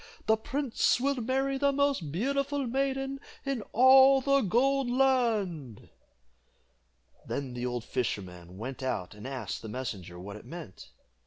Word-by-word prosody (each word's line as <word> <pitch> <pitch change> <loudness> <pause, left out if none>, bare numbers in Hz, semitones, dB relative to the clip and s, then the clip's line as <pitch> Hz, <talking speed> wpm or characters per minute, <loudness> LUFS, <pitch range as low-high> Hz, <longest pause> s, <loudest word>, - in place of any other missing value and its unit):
the 220 - +4
prince 265 +2 0
will 280 +2 0
marry 265 +3 0
the 280 0 +3
most 275 - 0
beautiful 275 - -1
maiden 270 +2 -1 0.3
in 275 -4 -1
all 265 +2 +7
the 275 +1 +3
Gold 260 +5 +2
Land!" 225 - 0 1.4
Then 135 -3 -4
the 125 0 -3
old 120 -2 -3
fisherman 95 -8 -4
went 130 +6 -6
out 115 -9 -3
and 105 +4 -9
asked 130 -6 -5
the 110 - -7
messenger 105 -8 -5
what 100 +3 -8
it 105 - -14
meant. 155 - -10
225 Hz, 140 wpm, -29 LUFS, -, 1.4 s, all